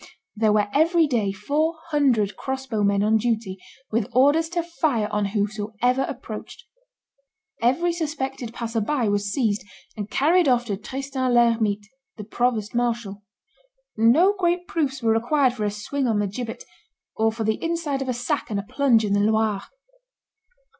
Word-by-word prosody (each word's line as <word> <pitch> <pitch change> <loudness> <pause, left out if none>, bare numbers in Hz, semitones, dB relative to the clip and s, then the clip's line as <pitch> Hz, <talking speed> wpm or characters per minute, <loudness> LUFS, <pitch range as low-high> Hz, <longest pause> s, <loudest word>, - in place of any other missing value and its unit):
There 215 0 +2
were 210 -1 +2
every 330 +3 +4
day 230 -8 0
four 295 - -1 0.2
hundred 245 -9 +2
crossbow 265 -5 -3
men 200 0 +2
on 220 +1 +3
duty, 220 -4 -2 0.3
with 220 0 0
orders 290 +6 +4
to 345 0 -1
fire 305 -10 0
on 210 -1 0
whosoever 215 +4 -1
approached. 230 -4 -8 1.0
Every 335 +9 +2
suspected 270 -7 -4
passer 230 -1 -3
by 240 0 0
was 205 0 0
seized, 215 -4 0 0.3
and 210 -1 -5
carried 330 +6 +3
off 245 -2 +3
to 205 -4 -3
Tristan 260 +3 -3
l'Hermite, 225 -4 +2 0.3
the 210 - -6
provost 220 -1 -1
marshal. 230 -4 -2 0.7
No 265 - +5
great 355 -2 0
proofs 275 -6 -2
were 225 -1 +3
required 255 +3 +2
for 215 -4 -3
a - - +1
swing 250 +7 -3
on 225 -3 +1
the 205 - +1
gibbet, 225 +4 -5 0.5
or 220 0 +2
for 225 0 -4
the 220 0 -1
inside 330 -5 -1
of 265 - -3
a - - +1
sack 245 0 -2
and 205 -2 -1
a - - -4
plunge 235 -1 +2
in 200 - 0
the 205 - +3
Loire. 215 -1 +1
235 Hz, 160 wpm, -24 LUFS, 210-275 Hz, 1.0 s, No